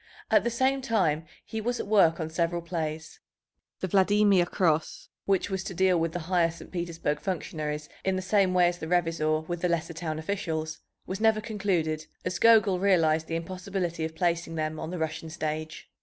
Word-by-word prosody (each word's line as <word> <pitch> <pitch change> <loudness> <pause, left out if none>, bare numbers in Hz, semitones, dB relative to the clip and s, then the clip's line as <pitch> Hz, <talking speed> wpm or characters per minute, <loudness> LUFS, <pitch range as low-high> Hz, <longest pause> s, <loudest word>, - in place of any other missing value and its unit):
At - - +5
the 235 - +1
same 260 +3 +1
time 180 - +1 0.2
he 220 - -4
was 240 +2 -1
at - - -3
work 190 -6 +4
on 160 -1 -3
several 170 +1 -1
plays. 160 -2 -4 0.6
The 185 - -1
Vladimir 195 -1 +4
Cross, 160 -4 0 0.2
which 195 0 +1
was 190 0 -2
to 190 - -5
deal 185 -1 +3
with 165 0 0
the 175 - -4
higher 170 0 +2
St. 170 - -11
Petersburg 170 -4 -2
functionaries 150 -5 -3 0.2
in 190 0 +1
the 185 - -2
same 190 -1 +2
way 180 -1 +5
as 175 0 -2
the 160 - -5
Revizor 160 -2 +1
with 175 -1 -3
the 180 - +1
lesser 170 0 -1
town 160 -1 -4
officials, 160 -2 -3 0.3
was 190 +3 -5
never 220 -1 +4
concluded, 185 -8 -1 0.2
as 180 -1 -2
Gogol 215 -5 +5
realized 160 -5 +3
the 165 - -2
impossibility 180 0 -3
of 160 0 -4
placing 170 -1 0
them 155 0 -2
on - - -5
the 180 - -4
Russian 160 0 -3
stage. 155 0 -4
175 Hz, 190 wpm, -28 LUFS, 160-190 Hz, 0.6 s, At